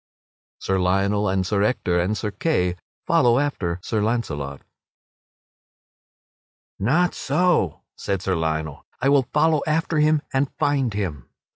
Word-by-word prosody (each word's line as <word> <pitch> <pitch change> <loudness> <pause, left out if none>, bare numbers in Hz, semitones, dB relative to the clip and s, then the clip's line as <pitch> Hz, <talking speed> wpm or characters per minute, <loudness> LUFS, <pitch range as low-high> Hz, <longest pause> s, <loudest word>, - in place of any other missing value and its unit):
[Sidenote: - - -18
Sir 95 -1 0
Lionel 100 +3 +1
and 95 -1 0
Sir 100 +2 0
Ector 90 -5 +1
and 95 +5 0
Sir 105 - -3
Kay 95 - 0 0.3
follow 120 -1 +4
after 100 -12 -1
Sir 110 -2 -1
Launcelot] 80 - -2 2.2
"Not 160 - +2
so," 175 - +1
said 100 -1 -3
Sir 95 - 0
Lionel, 80 -2 -2 0.2
"I 135 - +2
will 140 -3 +3
follow 155 0 +3
after 160 0 0
him, 150 0 +3
and 135 +1 +1
find 140 -4 +1
him." 80 -11 -4
105 Hz, 135 wpm, -23 LUFS, 90-145 Hz, 2.2 s, follow